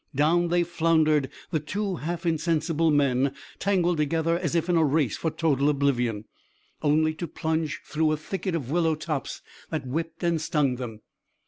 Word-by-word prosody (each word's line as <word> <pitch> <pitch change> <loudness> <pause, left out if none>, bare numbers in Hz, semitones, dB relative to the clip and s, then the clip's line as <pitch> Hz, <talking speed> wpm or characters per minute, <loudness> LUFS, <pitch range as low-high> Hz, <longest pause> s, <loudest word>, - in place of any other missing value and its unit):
Down 165 +5 +3
they 175 +1 +2
floundered, 160 -4 +2 0.2
the 160 - +1
two 190 +5 -3
half 170 +3 -4
insensible 165 0 +1
men 140 -2 +2 0.2
tangled 180 -3 +2
together 160 +2 +1
as 170 -2 -2
if 170 0 +1
in 175 - +2
a 165 - +4
race 145 -6 +2
for 165 - -1
total 145 -3 +1
oblivion, 125 -7 0 0.6
only 155 +1 +3
to 170 +2 -5
plunge 160 0 -2
through 155 0 +1
a 155 - +1
thicket 185 +3 -3
of 140 -5 -4
willow 165 -1 +2
tops 155 -2 -4 0.3
that 155 -4 -3
whipped 165 +6 -4
and 170 -2 +1
stung 150 -6 +1
them. 115 -4 -7
160 Hz, 165 wpm, -26 LUFS, 145-170 Hz, 0.6 s, a